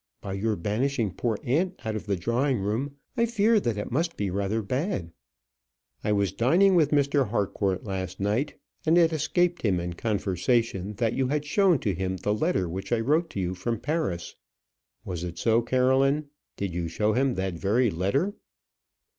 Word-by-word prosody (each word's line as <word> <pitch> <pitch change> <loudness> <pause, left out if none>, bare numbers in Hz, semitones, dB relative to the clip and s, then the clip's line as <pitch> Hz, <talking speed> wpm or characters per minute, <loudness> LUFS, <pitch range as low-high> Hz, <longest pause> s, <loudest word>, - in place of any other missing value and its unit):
By 95 - -6
your 105 +2 0
banishing 110 +3 -1
poor 115 0 -1
aunt 175 +9 0
out 110 -1 -2
of 110 - -5
the 100 - +1
drawing 120 +8 0
room, 110 +8 -2 0.2
I 235 -2 +2
fear 225 -1 +2
it 120 - 0
must 165 +6 -1
be 100 -2 -1
rather 100 +3 -1
bad." 125 - -2 0.9
"I 105 - 0
was 100 -2 +2
dining 165 - +4
with 160 -5 +4
Mr. 140 -4 +2
Harcourt 100 -3 -1
last 95 -2 -4
night, 105 +9 0 0.3
and 165 +2 +4
it 165 -1 +5
escaped 175 +4 +1
him 95 -5 +1
in 85 0 -3
conversation 100 +1 0
that 115 +2 0
you 130 -1 0
had 150 +2 -1
shown 185 +2 +4
to 100 - 0
him 95 +1 -2
the 105 +3 0
letter 105 - 0
which 95 +6 -6
I 120 - +3
wrote 155 +8 +1
to 100 - -5
you 90 -1 -1
from 110 +5 -3
Paris. 145 - -2 0.7
Was 90 -2 -4
it 85 -1 -5
so, 115 +4 +3
Caroline? 130 +4 +2 0.3
Did 100 -3 -3
you 85 -1 -2
show 105 +6 0
him 130 +1 +1
that 95 -1 -2
very 105 +7 +1
letter?" 100 - 0
115 Hz, 180 wpm, -27 LUFS, 95-145 Hz, 0.9 s, it